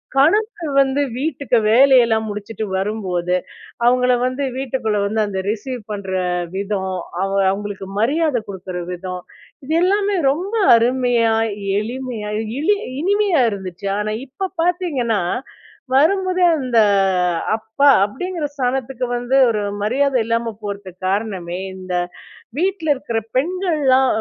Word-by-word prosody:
கணக்கு 345 - +2
வந்து 270 +1 +1 0.2
வீட்டுக்கு 280 -4 0
வேலையெல்லாம் 235 -3 +5
முடிச்சிட்டு 210 +1 -5
வரும்போது 185 -3 -1 0.5
அவங்கள 250 +1 +4
வந்து 255 +2 -2
வீட்டுக்குள்ள 250 -5 -1
வந்து 215 +2 0
அந்த 190 -2 -3
ரிசீவ் 245 +3 -4
பண்ற 200 -2 -5 0.5
விதம், 195 -1 -2 0.3
அவங்க 195 0 +1
அவங்களுக்கு 200 -1 -5
மரியாத 295 +3 +2
கொடுக்குற 185 -2 -6
விதம் 180 0 -6 0.4
இது 310 - -2
எல்லாமே 400 +2 +2 0.2
ரொம்ப 370 +9 -3 0.2
அருமையா, 240 -1 +2 0.5
எளிமையா, 235 -1 -5 0.3
இனி 405 +8 +3 0.3
இனிமையா 400 -2 +2
இருந்துச்சு. 190 -1 -6
ஆனா, 210 0 -2 0.2
இப்போ 385 +9 -4 0.2
பார்த்திங்கன்னா 315 - 0 0.7
வரும்போதே 370 +6 +3
அந்த 255 -5 -1 0.8
அப்பா 220 +6 0 0.2
அப்படிங்கிற 335 - -4
ஸ்தானத்துக்கு 255 -1 -1
வந்து, 245 +2 -1
ஒரு 215 -2 0 0.2
மரியாத 265 +6 +1
இல்லாம 230 0 -1
போறதுக்கு 200 -3 -7
காரணமே, 190 -3 -2 0.2
இந்த 185 -1 -7 0.7
வீட்ல 350 -3 +1
இருக்கிற 235 -4 -3 0.2
பெண்கள்லாம் 300 -4 +2
245 Hz, 110 wpm, -20 LUFS, 205-285 Hz, 0.8 s, வேலையெல்லாம்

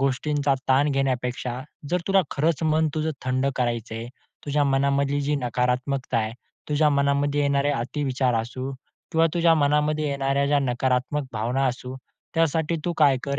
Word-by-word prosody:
गोष्टींचा 140 +1 +1
ताण 140 +3 +4
घेण्यापेक्षा 125 -2 -1 0.3
जर 180 +1 +1
तुला 195 -1 +4
खरंच 155 +1 0 0.3
तुझं 155 0 -1
थंड 130 +1 0
करायचंय. 115 -2 -2 0.4
तुझ्या 145 0 +2
मनामधली 140 +1 +1
जी 145 +1 0
नकारात्मकता 125 0 -1
आहे, 110 0 -2 0.4
तुझ्या 150 +1 +3
मनामध्ये 140 +1 +1
येणारे 140 0 +2
अतिविचार 130 -1 -1
असू 130 +4 -5 0.4
किंवा 165 0 +4
तुझ्या 170 -1 +4
मनामध्ये 150 0 +1
येणाऱ्या 140 0 0
ज्या 145 0 +3
नकारात्मक 130 +2 0
भावना 120 +5 0
असू, 125 0 -4 0.4
त्यासाठी 165 0 +1
तू 175 - 0
काय 145 -4 +5
कर, 140 0 -2
140 Hz, 140 wpm, -24 LUFS, 130-145 Hz, 0.4 s, काय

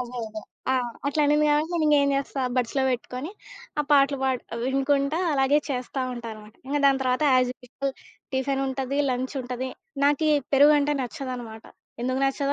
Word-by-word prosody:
అదే, 250 0 -6
అదే. 215 0 -7 0.3
ఆ! - - +3 0.3
అట్లా 300 +2 +1
అనింది 300 +1 +3
గాబట్టి 300 +3 +2
నేనింగ 305 -2 +3
ఏం 280 - +2
చేస్తా? 275 0 -3 0.2
బడ్స్‌లో 255 +2 +1
బెట్టుకొని, 255 +4 -3 0.5
ఆ - - +1
పాటలు 280 -1 +4
బాడి 260 -2 0 0.2
వినుకుంటా 275 +3 +1
అలాగే 275 +1 +3
చేస్తా 255 +1 -3
ఉంటానమాట. 220 -3 -8
ఇంగ 285 +2 -1
దాని 275 -1 +3
తర్వాత 255 +2 +1
యాజ్ 255 -1 +3
యూజువల్ 270 +2 -4 0.4
టిఫినుంటది, 270 0 -1
లంచుంటది. 255 0 -3 0.4
నాకి 290 +2 +3 0.2
పెరుగంటే 290 +1 +5
నచ్చదనమాట. 245 -4 -6 0.4
ఎందుకు 255 +1 0
నచ్చదో 275 +1 0
270 Hz, 145 wpm, -25 LUFS, 250-285 Hz, 0.5 s, పెరుగంటే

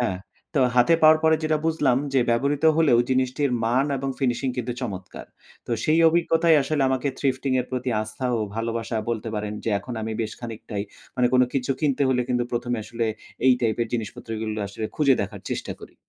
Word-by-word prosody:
হ্যাঁ। 95 -7 -1 0.4
তো 135 - +4 0.2
হাতে 125 +7 +5
পাওয়ার 155 0 +7
পরে 160 0 +5
যেটা 155 0 +2
বুঝলাম 145 -6 +2 0.2
যে 130 - +5
ব্যবহৃত 140 +5 +1
হলেও 145 -8 +4
জিনিসটির 130 +2 +1
মান 125 +4 +2
এবং 135 +1 -3
Finishing 130 0 0
কিন্তু 125 0 -2
চমৎকার। 95 -6 -6 0.4
তো - - -8
সেই 155 +1 +3
অভিজ্ঞতায় 165 -1 +3
আসলে 145 +1 0
আমাকে 130 +1 0
Thrifting 135 -1 0
এর 125 - -5
প্রতি 125 0 -2
আস্থা 110 +4 -5
ও - - -1 0.2
ভালোবাসা 115 0 -2
বলতে 115 0 -3
পারেন 105 0 -3
যে 115 - 0
এখন 125 +5 -8
আমি 110 0 -3
বেশ 110 0 -4
খানিকটাই 110 -3 -5 0.3
মানে 125 -1 +3
কোন 125 - +6
কিছু 135 -1 -1
কিনতে 145 -3 +1
হলে 125 -1 +2
কিন্তু 125 -1 +1
১ম 120 0 -2
এ - - -4
আসলে 115 0 -2 0.4
এই 130 - +8
টাইপের 115 0 0
জিনিসপত্রগুলোই 110 -1 -4
আসলে 110 +2 -4
খুঁজে 140 -3 +4
দেখার 100 0 -7
চেষ্টা - - -3
করি। - - -12
125 Hz, 190 wpm, -24 LUFS, 115-140 Hz, 0.4 s, এই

